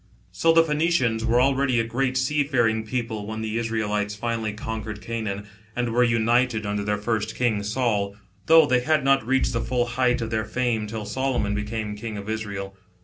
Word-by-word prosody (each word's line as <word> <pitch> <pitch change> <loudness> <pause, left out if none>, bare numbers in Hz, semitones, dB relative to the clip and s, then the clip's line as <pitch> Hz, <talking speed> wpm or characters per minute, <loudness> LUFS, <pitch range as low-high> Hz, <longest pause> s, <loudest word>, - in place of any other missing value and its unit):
So 130 - +3
the 165 0 +6
Phoenicians 150 -8 +1
were 115 +1 +3
already 130 -1 +2
a - - +2
great 125 +3 -1
seafaring 130 -5 +1
people 115 -3 -3
when 110 0 -4
the 110 +1 -2
Israelites 105 -2 -1
finally 115 0 -2
conquered 110 0 -5
Canaan 105 -2 -4 0.3
and 120 -1 -1
were 125 +1 +4
united 120 -1 +2
under 105 0 -2
their 105 0 0
first 110 +1 -2
king, 115 -4 +1
Saul, 105 -2 -1 0.3
though 160 -1 +8
they 130 -3 +3
had 155 +4 +1
not 135 -1 +3
reached 130 -1 +2
the 115 - 0
full 125 0 0
height 125 0 +1
of 115 -1 -4
their 110 -1 0
fame 115 -1 -1
till 110 0 -5
Solomon 120 -2 -1
became 105 0 -3
King 110 0 -6
of 100 +2 -5
Israel. 100 -3 -5
115 Hz, 185 wpm, -24 LUFS, 105-125 Hz, 0.3 s, though